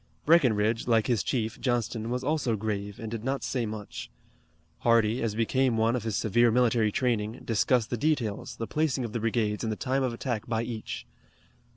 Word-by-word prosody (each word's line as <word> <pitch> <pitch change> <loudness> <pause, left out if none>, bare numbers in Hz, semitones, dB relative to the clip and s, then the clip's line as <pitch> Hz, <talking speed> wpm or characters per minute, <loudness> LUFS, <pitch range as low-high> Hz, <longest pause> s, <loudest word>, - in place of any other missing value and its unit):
Breckinridge, 115 -9 +3
like 115 -2 +3
his 120 -6 +1
chief, 115 -3 -2
Johnston, 120 -2 -1
was 125 +1 -2
also 140 -5 +1
grave 105 -1 -3
and 110 -1 -6
did 115 -2 -4
not 135 +2 -2
say 120 -4 -1
much. 105 -1 -7 0.7
Hardee, 115 0 +3
as 110 -3 -1
became 120 +2 +1
one 115 +2 +2
of 125 - -1
his 110 -3 -1
severe 120 +4 +3
military 115 -2 +3
training, 115 -2 -1
discussed 115 +1 +2
the 120 - 0
details, 125 -4 -1
the 115 - -4
placing 145 -2 0
of 110 - -6
the 120 - -1
brigades 110 -1 0
and 110 - -1
the - - -1
time 135 +1 0
of 130 -2 0
attack 115 -2 -3
by 115 -1 0
each. 115 -2 -5
115 Hz, 190 wpm, -28 LUFS, 110-125 Hz, 0.7 s, Breckinridge